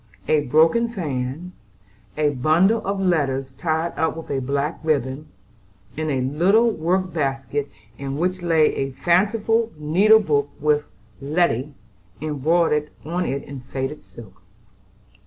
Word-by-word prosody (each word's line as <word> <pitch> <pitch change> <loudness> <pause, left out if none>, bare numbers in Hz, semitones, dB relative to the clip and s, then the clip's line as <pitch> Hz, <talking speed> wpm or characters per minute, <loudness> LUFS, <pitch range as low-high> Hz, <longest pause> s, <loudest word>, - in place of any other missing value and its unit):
A 155 - +4
broken 160 - +3
fan, 150 - -4 0.7
a 150 -1 +2
bundle 165 - +3
of 195 0 -1
letters 140 -8 0
tied 160 +4 -2
up 160 0 0
with 165 - -7
a 135 -1 -1
black 140 +4 -2
ribbon, 145 -1 -1 0.7
and 155 0 -2
a 135 -3 0
little 185 - +3
work 185 +1 -1
basket 140 -2 -2 0.3
in 135 0 -4
which 180 +3 -1
lay 165 -3 +3
a 135 0 -2
fanciful 215 - +1
needle 190 +9 +5
book 145 -8 0
with 150 0 +1 0.4
"Letty" 145 -2 0 0.4
embroidered 150 +1 +1 0.2
on 175 +3 -2
it 140 +2 -3
in 140 -1 -8
faded 135 +3 -5
silk. 95 -1 -14
155 Hz, 130 wpm, -22 LUFS, 135-175 Hz, 0.7 s, needle